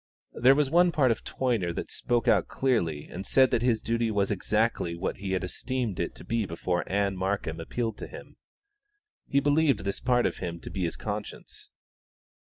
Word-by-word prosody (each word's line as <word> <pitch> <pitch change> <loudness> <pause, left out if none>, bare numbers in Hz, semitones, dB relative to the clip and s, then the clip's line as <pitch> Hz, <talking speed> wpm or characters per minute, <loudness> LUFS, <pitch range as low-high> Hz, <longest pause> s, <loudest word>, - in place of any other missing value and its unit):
There 130 +3 +5
was 145 -2 +1
one 175 +1 +5
part 135 -7 +3
of 115 - -2
Toyner 115 -10 -1
that - - -5
spoke 120 -1 -1
out - - +4
clearly 85 - 0
and 95 - -6
said 130 +5 +4
that 115 - +2
his 120 -3 +1
duty 115 0 0
was 100 -2 +1
exactly 105 -3 0
what 85 +3 -3
he 95 0 -3
had 95 - 0
esteemed 120 +3 -3
it - - -2
to - - -11
be 115 -3 -1
before 90 +1 -1
Ann 100 0 +1
Markham 95 -3 -2
appealed 115 +6 -3
to - - -6
him. - - -11 0.9
He 140 - +3
believed 145 -5 +3
this 100 0 -2
part 125 -1 +2
of - - -1
him 85 -2 -5
to - - -8
be 95 -2 -2
his 85 - -3
conscience. 105 0 -6
110 Hz, 190 wpm, -28 LUFS, 95-125 Hz, 0.9 s, There